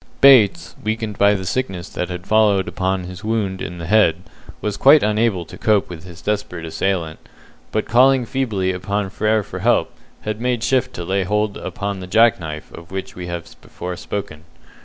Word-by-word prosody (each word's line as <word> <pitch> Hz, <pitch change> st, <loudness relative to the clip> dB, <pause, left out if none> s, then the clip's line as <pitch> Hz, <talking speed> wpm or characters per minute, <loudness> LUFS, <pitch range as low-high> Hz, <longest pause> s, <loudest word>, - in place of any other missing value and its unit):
Bates, 105 Hz, -12 st, +5 dB
weakened 110 Hz, -1 st, -3 dB
by 100 Hz, +1 st, +5 dB
the 95 Hz, -1 st, -4 dB
sickness 95 Hz, -4 st, -2 dB
that 90 Hz, -, -4 dB
had 90 Hz, 0 st, -6 dB
followed 105 Hz, -3 st, +3 dB
upon 95 Hz, 0 st, -1 dB
his 90 Hz, +3 st, -9 dB
wound 105 Hz, -4 st, -1 dB
in 90 Hz, -, -5 dB
the 85 Hz, -, -6 dB
head, 90 Hz, -3 st, +3 dB, 0.4 s
was 105 Hz, -1 st, -2 dB
quite 145 Hz, +6 st, +6 dB
unable 105 Hz, -4 st, +1 dB
to -, -, -12 dB
cope 105 Hz, -4 st, +2 dB
with 85 Hz, 0 st, -9 dB
his 85 Hz, -2 st, -12 dB
desperate 100 Hz, -5 st, -2 dB
assailant, 85 Hz, -1 st, -2 dB, 0.5 s
but 110 Hz, -, 0 dB
calling 130 Hz, +1 st, +4 dB
feebly 110 Hz, -8 st, -1 dB
upon 95 Hz, +2 st, -2 dB
Frere 110 Hz, +1 st, +1 dB
for -, -, -7 dB
help, -, -, +2 dB, 0.3 s
had 110 Hz, +1 st, -4 dB
made 125 Hz, -2 st, 0 dB
shift 130 Hz, 0 st, +1 dB
to 85 Hz, -, -5 dB
lay 95 Hz, +2 st, 0 dB
hold 105 Hz, +2 st, 0 dB
upon 100 Hz, -4 st, -4 dB
the 90 Hz, -, -7 dB
jack 115 Hz, +3 st, +4 dB
knife 75 Hz, -2 st, -7 dB
of 85 Hz, 0 st, -11 dB
which 95 Hz, 0 st, -5 dB
we 90 Hz, -1 st, -6 dB
have 85 Hz, -1 st, -6 dB
before 90 Hz, 0 st, -6 dB
spoken. 80 Hz, -6 st, -6 dB
100 Hz, 185 wpm, -20 LUFS, 90-110 Hz, 0.5 s, quite